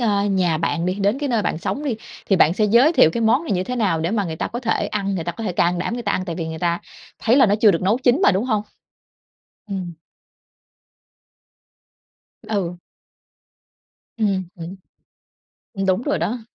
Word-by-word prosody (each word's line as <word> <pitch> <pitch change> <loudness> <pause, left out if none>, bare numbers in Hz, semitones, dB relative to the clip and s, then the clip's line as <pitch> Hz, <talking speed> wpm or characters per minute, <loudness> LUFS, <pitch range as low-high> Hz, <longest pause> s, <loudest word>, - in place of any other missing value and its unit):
ơ, 205 -4 +1
nhà 185 -5 +1
bạn 165 +1 -1
đi, 185 - 0
đến 205 +5 0
cái 290 -1 -2
nơi 230 -4 +1
bạn - - -1
sống 285 - -3
đi, 245 -6 -1 0.3
thì 195 - +3
bạn 165 -2 +5
sẽ 215 - +1
giới 240 +10 +5
thiệu 205 - +5
cái 235 - -3
món 230 +8 +2
này 320 - -2
như 185 -1 0
thế 250 0 -4
nào 195 -8 +1
để 165 +3 -1
mà 210 -3 0
người 160 -2 -5
ta - - -2
có 240 - -5
thể 225 -3 0
ăn, 200 -2 -2
người 165 -3 -3
ta 175 - -3
có 225 - -7
thể 190 - -2
can 175 0 +1
đảm 185 - -2
người 240 - -4
ta 205 - -1
ăn, 185 - -1
tại 170 -3 -4
vì 165 -2 -4
người 160 - -6
ta 170 0 0 0.4
thấy 235 +3 +2
là 265 -4 +6
nó 205 - +3
chưa 215 - +7
được 170 -1 -1
nấu 210 +6 +2
chín 255 +5 +2
mà, - - +5
đúng 190 +5 0
hông? 215 -5 0 1.1
Ừm. 185 -3 -4 2.6
Ừ. 180 -5 -2 1.4
Ừm 200 -4 0
hứm. 170 +3 -8 1.1
Đúng 185 +4 +2
rồi 195 - -1
đó. 220 +8 -2
200 Hz, 210 wpm, -21 LUFS, 175-230 Hz, 2.6 s, chưa